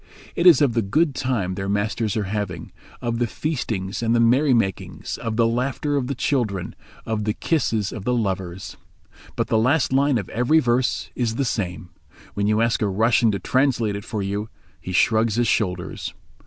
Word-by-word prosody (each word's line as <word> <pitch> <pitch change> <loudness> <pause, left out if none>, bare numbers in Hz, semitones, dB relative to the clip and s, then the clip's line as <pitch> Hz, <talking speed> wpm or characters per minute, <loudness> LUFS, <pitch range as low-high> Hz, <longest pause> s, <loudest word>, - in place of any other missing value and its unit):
It 170 - +3
is 165 -4 +8
of 130 -5 +2
the 115 - +2
good 145 +10 +1
time 125 -9 -1
their 95 +1 -4
masters 105 +1 -1
are 105 - 0
having, 95 -4 -4 0.3
of 120 -1 -1
the 120 - +1
feastings 115 -8 -3
and 115 0 +2
the - - +3
merrymakings, 120 - +1
of 115 -1 -3
the 115 - +4
laughter 130 +5 -1
of 135 -3 0
the 140 - -2
children, 115 -9 -1 0.3
of 110 -1 -2
the 105 +1 -1
kisses 115 - 0
of 110 - -6
the 125 +3 +1
lovers. 95 -5 -3 0.6
But - - 0
the 110 - +1
last 130 +4 +2
line 140 -1 +3
of 105 - -4
every 125 +7 +2
verse 125 -3 +1
is 115 -3 -1
the 140 - 0
same. 90 -6 -3 0.4
When 100 0 -1
you 110 +1 +2
ask 115 0 +1
a 105 - +2
Russian 110 +3 +3
to - - 0
translate 125 -6 +1
it 100 - -6
for 105 -3 -4
you 100 +2 -3 0.3
he 90 - -7
shrugs 110 +4 +2
his 120 0 +2
shoulders. 90 -5 -2
115 Hz, 190 wpm, -23 LUFS, 100-125 Hz, 0.6 s, is